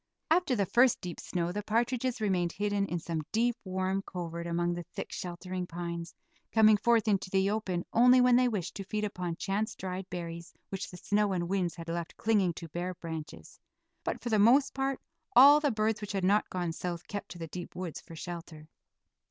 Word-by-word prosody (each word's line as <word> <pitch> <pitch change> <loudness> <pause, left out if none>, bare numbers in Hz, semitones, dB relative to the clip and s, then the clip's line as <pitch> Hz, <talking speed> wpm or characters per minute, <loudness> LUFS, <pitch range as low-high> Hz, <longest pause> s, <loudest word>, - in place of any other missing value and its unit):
After 330 -6 +3
the 200 -3 +1
first 245 +6 +4
deep 175 -2 -6
snow 175 -1 -2
the 205 +3 -3
partridges 240 +3 0
remained 185 -5 0
hidden 205 0 0
in 175 - -2
some 165 -1 -3
deep, 235 +2 +2
warm 190 0 -1
covert 170 -3 -5
among 175 +1 0
the 175 - -4
thick, 175 - -7
sheltering 180 +1 -5
pines, 170 0 -5 0.4
coming 215 -1 +6
forth 225 +1 +3
into 195 -3 +1
the 190 +1 +2
open 190 -5 -2
only 250 +2 +7
when 250 -1 +6
they 250 0 +5
wished 205 -8 -2
to 195 - -4
feed 210 +2 -3
upon 180 -4 -3
chance 205 +4 -2
dried 185 0 -5
berries 170 -1 -6
which 195 - -4
the 180 - -10
snow 205 +1 +1
and 175 -2 -1
winds 180 -3 0
had 165 -1 -8
left 170 0 -4
clinging 205 -5 +2
to 165 - -7
bare 175 +3 -3
branches; 160 -3 -8 0.4
but - - -2
for 240 - -4
the 215 -2 +3
most 250 +7 +5
part 270 0 -1 0.4
all 280 +4 +9
the 300 -1 +1
birds 220 -2 0
which 205 -1 -5
had 195 -2 -1
not 205 +3 +3
gone 175 -2 -2
south 175 +1 -5
kept 205 0 -5
to 175 - -9
the 165 - -5
deep 175 +2 -7
woods 180 -3 -5
for 165 - -12
shelter. 165 -2 -8
190 Hz, 200 wpm, -30 LUFS, 175-215 Hz, 0.4 s, all